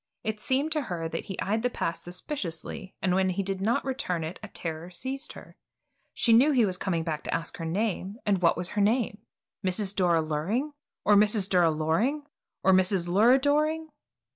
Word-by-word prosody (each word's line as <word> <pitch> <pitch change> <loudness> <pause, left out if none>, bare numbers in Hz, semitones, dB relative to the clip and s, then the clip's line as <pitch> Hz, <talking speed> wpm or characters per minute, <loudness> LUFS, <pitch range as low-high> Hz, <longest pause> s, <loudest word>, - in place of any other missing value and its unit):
It 215 -2 -3
seemed 270 +7 0
to 310 -1 +2
her 165 -2 -3
that - - -5
he 190 - -7
eyed 215 +3 0
the 250 - +1
pass 170 -7 -3
suspiciously 180 - -6
and 185 -1 +2
when 190 0 +2
he 185 +2 -1
did 195 0 -3
not 225 +4 +1
return 255 - -2
it 160 +3 -6
a 215 - -7
terror 165 -3 -5
seized 265 - -4
her. - - -13 0.5
She 230 - +2
knew 250 +7 +6
he 250 -5 +4
was 185 -2 -1
coming 175 -3 -1
back 155 -2 -3
to - - -3
ask 165 - -4
her 165 - -5
name, 200 +2 -2
and 200 -3 +1
what 170 -2 +3
was 180 +1 0
her 205 - -1
name? 215 0 +1 0.4
Mrs. 190 +2 +1
Dora 170 -4 +3
Luring, 190 - -2 0.3
or 210 - +5
Mrs. 205 -1 +4
Dura 180 -4 +4
Loring, 165 - 0 0.4
or 190 - +5
Mrs. 185 -1 +3
Lura 220 +8 +5
Doring? 305 +3 +1
195 Hz, 195 wpm, -27 LUFS, 175-240 Hz, 0.5 s, knew